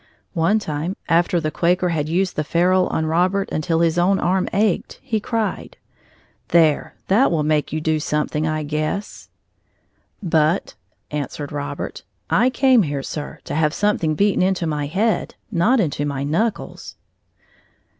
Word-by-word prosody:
One 180 +4 +2
time, 160 -1 -3
after 170 +1 +3
the 155 -1 -2
Quaker 180 +2 +1
had 155 -3 -1
used 185 +2 0
the 150 - 0
ferule 180 +4 +2
on 160 - -1
Robert 180 +5 +1
until 160 +2 0
his 170 0 +2
own 190 +3 +3
arm 185 +1 +1
ached, 205 -2 0
he 235 -5 -1
cried: 225 0 -3 0.7
"There, 160 -3 +3
that 215 +8 +4
will 160 -3 0
make 150 -1 0
you 155 - -1
do 155 0 0
something, 150 +1 -1
I 155 0 -1
guess." 155 +7 -3 0.9
"But," 160 0 +1 0.4
answered 145 0 -4
Robert, 145 -1 -5 0.3
"I 250 - +4
came 260 -2 +4
here, 145 -6 -2
Sir, 150 +1 -6
to - - -6
have 155 0 +1
something 190 -7 +1
beaten 200 +2 +2
into 185 -1 +1
my 150 -2 -2
head, 205 +8 0 0.2
not 225 +10 +3
into 150 -7 0
my 140 -2 -2
knuckles." 195 +10 -2
170 Hz, 150 wpm, -21 LUFS, 155-195 Hz, 0.9 s, that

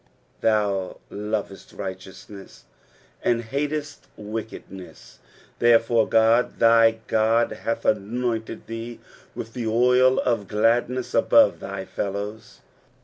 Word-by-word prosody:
7 - - +1
Thou 100 -3 -1
lovest 105 -1 -5
righteousness, 95 +1 -9 0.6
and 120 -1 +1
hatest 145 +4 -4
wickedness: 105 -3 -9 0.4
therefore 115 -1 +3
God, 115 +2 +3
thy 115 0 +5
God, 115 +2 +2
hath 115 - -4
anointed 115 +2 -2
thee 115 +1 -7 0.4
with 115 - -7
the 120 -3 -4
oil 125 +3 +4
of 115 -5 -1
gladness 120 +4 0
above - - +4
thy 100 -1 -6
fellows. 100 +3 -6
115 Hz, 100 wpm, -24 LUFS, 105-120 Hz, 0.6 s, thy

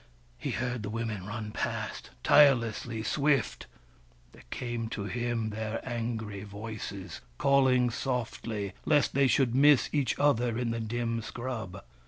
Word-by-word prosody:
He - - -3
heard 125 0 -2
the 105 - -4
Women 110 -4 -3
run 105 0 -5
past, - - -3
tirelessly 115 -5 +4
swift; 140 +2 +1 0.6
there - - -16
came 120 - -3
to 110 -3 -4
him 120 0 -2
their 110 +1 -3
angry 115 -4 -3
voices, 100 -2 -7 0.2
calling 130 -3 +4
softly, 115 -5 -3
lest 150 -2 +3
they 140 0 +4
should 130 -2 +3
miss 140 +1 +5
each 145 -4 +1
other 120 -5 +2
in 120 -1 -1
the 115 - -2
dim 115 +1 -2
scrub. 115 -3 -5
115 Hz, 135 wpm, -30 LUFS, 110-125 Hz, 0.6 s, miss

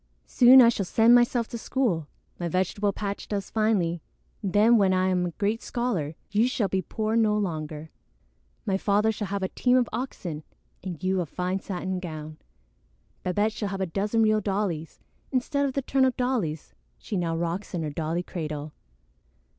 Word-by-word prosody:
"Soon 250 - +8
I 230 - +7
shall 215 -4 -1
send 225 +4 +5
myself 240 -1 +4
to 235 - -5
school. 210 - -1 0.3
My 175 - -2
vegetable 190 +4 0
patch 200 0 -5
does 200 -2 -4
finely. 195 -7 +1 0.4
Then, 210 +4 +4
when 190 -2 +3
I 185 0 +2
am 180 -1 +1
a - - -5
great 210 +5 -1
scholar, 190 -12 -2 0.2
you 215 +4 +3
shall 235 -5 0
be 190 0 0
poor 220 +3 -2
no 215 -2 +3
longer. 155 -5 -4 0.7
My 195 -2 +1
father 210 +2 +2
shall 210 -2 -4
have 200 +1 -3
a 190 - -1
team 250 0 +2
of 245 -2 +2
oxen 180 - -4 0.4
and 180 -3 -6
you 185 0 +1
a 170 - -4
fine 180 +5 -2
satin 190 -1 -4
gown; 155 -3 -7 0.8
Babette 205 +4 0
shall 210 -2 -3
have 195 -1 -4
a 190 - 0
dozen 205 +6 0
real 215 0 +3
dollies 190 -6 -2 0.3
instead 280 +2 0
of 265 - -4
the 275 - -1
turnip 260 -1 +2
dollies 225 - -2 0.2
she 205 - -6
now 165 -3 -1
rocks 170 +4 -3
in 165 - -2
her 150 - -3
dolly 165 +3 -2
cradle." 155 -4 -5
195 Hz, 180 wpm, -26 LUFS, 175-225 Hz, 0.8 s, Soon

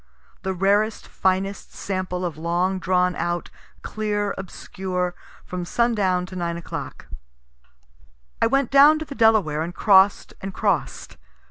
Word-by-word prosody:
The 190 0 -3
rarest, 205 +4 +1
finest 190 +1 -1
sample 185 -2 -3
of 170 -4 -3
long 175 +4 -1
drawn 180 0 +1
out 175 0 -3 0.3
clear 205 -2 -2
obscure, 185 -1 -4 0.3
from 180 -1 -5
sundown 195 -3 +1
to 185 - -10
9 170 -1 -2
o'clock. 170 - -7 1.4
I - - +5
went 275 +1 +1
down 285 +3 +7
to 315 - -5
the 290 - -8
Delaware, 215 - +3
and 170 +2 -4
cross'd 195 -1 +4
and 195 0 -6
cross'd. 200 -8 -2
190 Hz, 130 wpm, -23 LUFS, 180-210 Hz, 1.4 s, down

